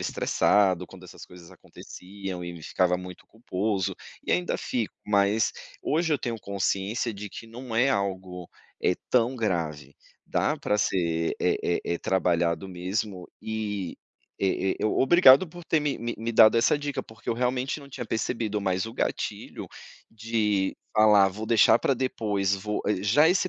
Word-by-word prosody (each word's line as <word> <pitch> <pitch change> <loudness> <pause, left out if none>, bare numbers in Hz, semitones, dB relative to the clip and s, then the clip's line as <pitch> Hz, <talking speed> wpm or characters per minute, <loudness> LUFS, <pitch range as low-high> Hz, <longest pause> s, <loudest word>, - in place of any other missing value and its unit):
estressado 95 -3 +2
quando 95 -1 -14
essas 90 - -12
coisas 90 -1 -14
aconteciam 95 -1 -9
e 85 - -5
me 85 -2 -11
ficava 90 +1 +1
muito 90 0 -10
culposo, 105 -3 -2 0.3
e - - -4
ainda 180 0 +1
fico 115 -4 -3
mas, 100 +1 +2 0.3
hoje 160 +1 +1
eu 145 - +2
tenho 120 -3 -3
consciência 100 +3 -1
de 105 +1 -7
que 115 - -10
não 120 +1 -8
é 125 +4 +4
algo, 95 -4 -3 0.3
eh, 90 - +2 0.2
tão 125 +1 +3
grave, 80 - -2 0.3
dá - - 0
pra 105 - -1
ser, 85 -4 0
eh - - +2
eh 85 - 0
eh, 85 - -1
trabalhado 85 -1 0
mesmo 95 +1 -4
e, 105 -4 -4 0.4
eh 95 -1 0
eh, - - -1
obrigado 135 +5 +6
por 175 +2 -11
ter 160 -1 +2
me 145 -2 -1
me 120 0 -3
me 115 +2 -3
dado 110 0 +7
essa 115 +5 +3
dica 145 -2 -3
porque 110 -2 -14
eu - - +1
realmente 125 +4 -1
não 140 - -13
tinha 125 -3 -6
percebido, 110 -1 -2
mais 95 +1 -1
o 115 - -7
gatilho - - -3 0.4
de 110 -3 0 0.2
falar: 105 -2 +6
"Vou 105 +3 -6
deixar 115 0 +5
pra 135 - +2
depois, 105 -6 0
vou" 105 +2 -3 0.2
Já 140 +11 +5
esse 185 +1 +2
105 Hz, 165 wpm, -26 LUFS, 95-115 Hz, 0.4 s, dado